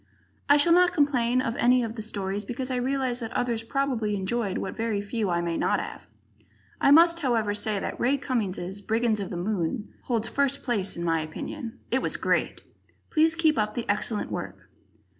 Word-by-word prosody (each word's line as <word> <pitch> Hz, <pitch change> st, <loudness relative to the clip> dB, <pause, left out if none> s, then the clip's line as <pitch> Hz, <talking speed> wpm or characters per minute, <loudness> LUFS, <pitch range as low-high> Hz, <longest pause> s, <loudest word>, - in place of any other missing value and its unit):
I 285 Hz, -, +7 dB
shall 335 Hz, +4 st, +4 dB
not 360 Hz, 0 st, +5 dB
complain 255 Hz, -4 st, +2 dB
of 230 Hz, -2 st, -2 dB
any 250 Hz, +1 st, +4 dB
of 225 Hz, 0 st, -4 dB
the 220 Hz, -, -5 dB
stories, 200 Hz, -1 st, -3 dB
because 255 Hz, +4 st, -4 dB
I 255 Hz, -, 0 dB
realize 255 Hz, -1 st, -1 dB
that 225 Hz, -1 st, -5 dB
others 235 Hz, -2 st, 0 dB
probably 230 Hz, -4 st, -1 dB
enjoyed 200 Hz, +1 st, -1 dB
what -, -, -4 dB
very 225 Hz, -2 st, -1 dB
few 205 Hz, 0 st, -2 dB
I 170 Hz, -1 st, +1 dB
may 170 Hz, -1 st, -2 dB
not -, -, +1 dB
have. -, -, -7 dB, 0.7 s
I -, -, +5 dB
must, 335 Hz, +3 st, +6 dB
however, 230 Hz, -8 st, +1 dB
say 210 Hz, 0 st, +1 dB
that -, -, -5 dB
Ray 270 Hz, +4 st, +2 dB
Cummings' 200 Hz, -7 st, -2 dB
"Brigands 220 Hz, +1 st, +1 dB
of 195 Hz, -, -4 dB
the 175 Hz, -, -5 dB
Moon" 200 Hz, +3 st, -2 dB
holds 230 Hz, -2 st, 0 dB
first 280 Hz, 0 st, 0 dB
place, 210 Hz, -9 st, 0 dB
in 170 Hz, -, -3 dB
my 165 Hz, -1 st, +1 dB
opinion. 230 Hz, -, -6 dB
It 260 Hz, +2 st, +2 dB
was -, -, -2 dB
great! -, -, 0 dB, 0.5 s
Please 320 Hz, 0 st, +3 dB
keep 315 Hz, -5 st, +3 dB
up 215 Hz, 0 st, -1 dB
the 240 Hz, -, -3 dB
excellent 210 Hz, +1 st, -1 dB
work. -, -, -6 dB
230 Hz, 195 wpm, -26 LUFS, 205-265 Hz, 0.7 s, I